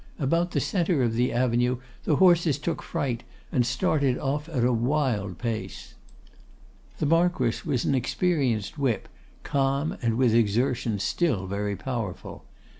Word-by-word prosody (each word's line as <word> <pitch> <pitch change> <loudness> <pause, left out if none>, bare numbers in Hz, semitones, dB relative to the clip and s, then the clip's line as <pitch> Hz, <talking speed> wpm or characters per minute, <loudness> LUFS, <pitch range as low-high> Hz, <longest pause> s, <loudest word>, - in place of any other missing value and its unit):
About 170 +5 +1
the - - 0
centre 170 -7 +1
of 115 -2 +1
the 125 +2 +1
avenue 125 0 +1 0.3
the 155 - +3
horses 175 -4 +4
took 160 +2 -3
fright, 120 -4 -2 0.3
and 125 - +2
started 130 +2 +1
off 145 +3 -2
at 130 -7 -1
a 125 +1 +3
wild 115 - 0
pace. 115 -3 -5 1.0
The - - -1
Marquess 165 -5 +1
was 130 -6 0
an - - +2
experienced 135 - 0
whip, 130 -6 0 0.4
calm, 140 +1 0
and 115 -2 0
with 125 -3 +3
exertion 115 0 +1
still 105 - 0
very 100 +1 -2
powerful. 115 -6 -5
130 Hz, 140 wpm, -26 LUFS, 115-150 Hz, 1.0 s, horses